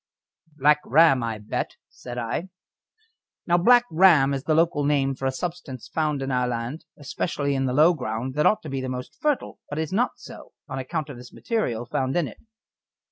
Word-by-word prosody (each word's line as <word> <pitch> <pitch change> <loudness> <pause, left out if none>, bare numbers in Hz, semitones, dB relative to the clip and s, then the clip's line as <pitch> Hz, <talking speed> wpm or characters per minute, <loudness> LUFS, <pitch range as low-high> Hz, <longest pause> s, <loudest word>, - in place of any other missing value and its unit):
"Black 150 +1 +4
Ram, 145 -1 +5
I 115 -2 -3
bet," 105 0 -4
said 120 -1 -9
I. 120 +10 -3 1.0
Now 175 0 +3
Black 245 +6 +6
Ram 160 -5 +5
is 135 -1 -4
the 155 - +2
local 165 -2 +2
name 140 -2 +1
for 135 0 -3
a - - +1
substance 155 -4 -6
found 150 -3 -1
in 135 - -3
our 125 -1 +1
land, 125 +6 -4
especially 140 0 -2
in 135 -1 0
the 125 - -1
low 155 +6 +5
ground 125 -3 -4
that 150 +2 +3
ought 215 - +2
to 155 - -7
be 135 -1 -3
the 130 - -4
most 125 0 -6
fertile, 300 -3 -1
but 145 - -5
is 160 +2 -2
not 240 +5 0
so, - - -12
on 135 -2 -5
account 135 +3 -4
of 135 - -8
this 125 0 -12
material 125 - -2
found 130 +4 -1
in 170 -5 +1
it. - - -12
140 Hz, 200 wpm, -24 LUFS, 130-160 Hz, 1.0 s, Black